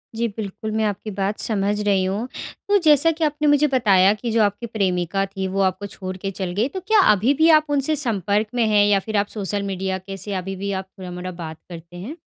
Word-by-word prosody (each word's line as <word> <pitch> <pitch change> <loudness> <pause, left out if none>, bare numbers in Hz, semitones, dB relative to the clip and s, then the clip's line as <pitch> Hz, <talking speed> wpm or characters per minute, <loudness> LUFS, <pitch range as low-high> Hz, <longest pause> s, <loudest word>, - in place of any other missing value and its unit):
जी, 235 +1 0
बिल्कुल, 210 +1 -5
मैं 220 0 0
आपकी 210 +1 -3
बात 195 +2 -1
समझ 205 -1 -1
रही 200 -2 +2
हूँ। 200 +6 -2 0.4
तो 410 - +5
जैसा 305 +2 +5
कि 320 0 -4
आपने 300 0 0
मुझे 290 +1 +4
बताया 200 -5 +4
कि 225 +2 -4
जो 225 0 +2
आपकी 205 +3 -1
प्रेमिका 195 -3 -1
थी 195 -1 -4
वो 195 +1 -1
आपको 190 +1 0
छोड़ 185 -1 -7
के 195 +1 -4
चल 185 -2 -4
गई। 230 +5 +2
तो 380 - -5
क्या 435 -1 +5
अभी 215 +7 +3
भी 320 +3 +4
आप 305 - -12
उनसे 290 +2 +1
संपर्क 210 - 0
में 235 - +2
हैं, 205 -1 +4
या 205 -1 +3
फिर 215 +1 -3
आप 200 - +1
सोशल 205 -1 -3
मीडिया 190 -1 -2
के 195 +1 -8
से 200 +2 -6
अभी 190 +1 -4
भी 200 +1 -4
आप 190 - -17
थोड़ा-मोड़ा 180 0 -6
बात 160 -3 -8
करते 170 0 -10
हैं? 230 - -7
205 Hz, 235 wpm, -22 LUFS, 190-230 Hz, 0.4 s, तो